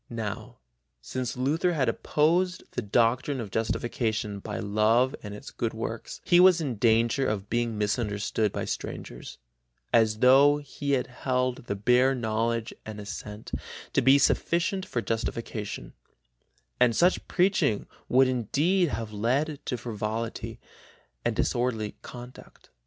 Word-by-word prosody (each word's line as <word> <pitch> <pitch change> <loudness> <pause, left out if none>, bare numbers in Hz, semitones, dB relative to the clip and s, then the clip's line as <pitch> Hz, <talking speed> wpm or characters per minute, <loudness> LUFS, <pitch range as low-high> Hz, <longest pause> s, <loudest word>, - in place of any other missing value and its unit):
Now, 110 -4 -5 0.4
since 125 - -4
Luther 155 +7 +1
had 135 -6 +1
opposed 170 +9 +1
the - - -3
doctrine 120 +5 +1
of 110 -5 -5
justification 110 -2 -1
by - - -5
love 110 +5 +2
and 105 -1 -7
its - - -10
good - - -3
works, - - -5
he 175 - +5
was 180 -1 +7
in 135 -8 -3
danger 115 +4 +3
of 105 -1 -3
being 120 -1 0
misunderstood 105 0 0
by - - -3
strangers, - - -6 0.6
as 110 -2 +4
though 135 +5 +6
he 145 0 -4
held 125 -1 -1
the 100 - -1
bare 125 +6 +3
knowledge 115 -1 -1
and 110 -1 -7
assent 105 +1 -7 0.4
to - - +3
be 135 +2 +6
sufficient 175 +6 +1
for 120 - -2
justification, 110 - -4 0.9
and 120 -2 +4
such 180 +2 +2
preaching 180 - +2 0.2
would 130 +1 +5
indeed 145 - +1
have 110 -2 -4
led 135 +8 0
to 125 - -1
frivolity 110 0 -4 0.6
and - - 0
disorderly 115 -4 -1
conduct. 125 0 -12
120 Hz, 130 wpm, -27 LUFS, 110-135 Hz, 0.9 s, was